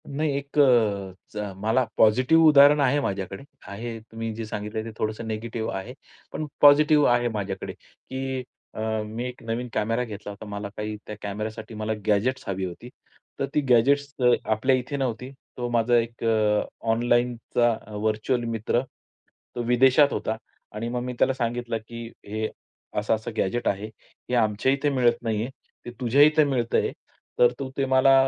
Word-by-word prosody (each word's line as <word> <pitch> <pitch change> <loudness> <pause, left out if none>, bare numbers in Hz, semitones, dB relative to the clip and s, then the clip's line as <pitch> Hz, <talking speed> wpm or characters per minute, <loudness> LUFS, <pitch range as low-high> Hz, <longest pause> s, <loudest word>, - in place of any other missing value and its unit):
नाही 150 +2 -1
एक 140 +1 -7
अ, 105 -5 +1
मला 110 +6 +1
पॉझिटिव्ह 130 +9 +5
उदाहरण 145 0 +7
आहे 140 +1 +3
माझ्याकडे 95 -1 -4 0.2
आहे. 115 +3 -6
तुम्ही 115 0 -6
जे 115 0 -5
सांगितले 105 +1 -4
ते 115 - -7
थोडंसं 110 +1 -2
निगेटिव्ह 110 +1 -3
आहे. 110 +6 -7 0.4
पण 155 - -3 0.2
पॉझिटिव्ह 150 +1 +6
आहे 120 0 +3
माझ्याकडे, 100 -2 -4
की 130 0 -6 0.3
अ, - - -5 0.2
मी 110 +3 -5
एक 125 0 -9
नवीन 115 +2 -3
कॅमेरा 115 +3 0
घेतला 105 -3 -7
होता. 100 +2 -10
मला 100 0 -5
काही 105 0 -3
त्या 105 - -6
कॅमेरासाठी 105 +3 -5
मला 110 +1 -2
गॅजेट्स 115 +6 +1
हवी 95 -1 -2
होती. 90 +7 -8 0.5
तर - - +1
ती 150 - +3
गॅजेट्स 140 +4 +3 0.3
आपल्या 110 +5 +2
इथे 130 +3 -3
नव्हती. 125 -1 -2 0.3
तो 120 -1 -2
माझा 120 0 +3
एक 115 0 -2
अ, 110 -2 +2 0.3
ऑनलाईनचा 120 0 +1 0.2
व्हर्चुअल 110 +4 0
मित्र 115 +2 0 0.7
तो 120 - -2
विदेशात 130 +4 +5
होता 110 - -2 0.4
आणि 115 +2 -3
मग 125 0 -2
मी 125 0 -4
त्याला 135 - +3
सांगितलं, 120 -2 -2
की 115 0 -7 0.2
"हे 110 +1 -2 0.5
असं-असं 110 +2 -1
गॅजेट 120 +6 0
आहे, 100 +1 0 0.4
हे 125 - +1
आमच्या 110 +2 +2
इथे 140 +2 +1
मिळत 125 -4 +2
नाहीये, 110 +1 -1 0.4
ते 120 - -6
तुझ्या 130 +2 +3
इथे 155 +1 +6
मिळतंय, 125 -4 0 0.5
तर 120 0 +6
तू 135 -1 -4
ते 135 - +1
मला 130 +1 +5
115 Hz, 160 wpm, -25 LUFS, 110-130 Hz, 0.7 s, उदाहरण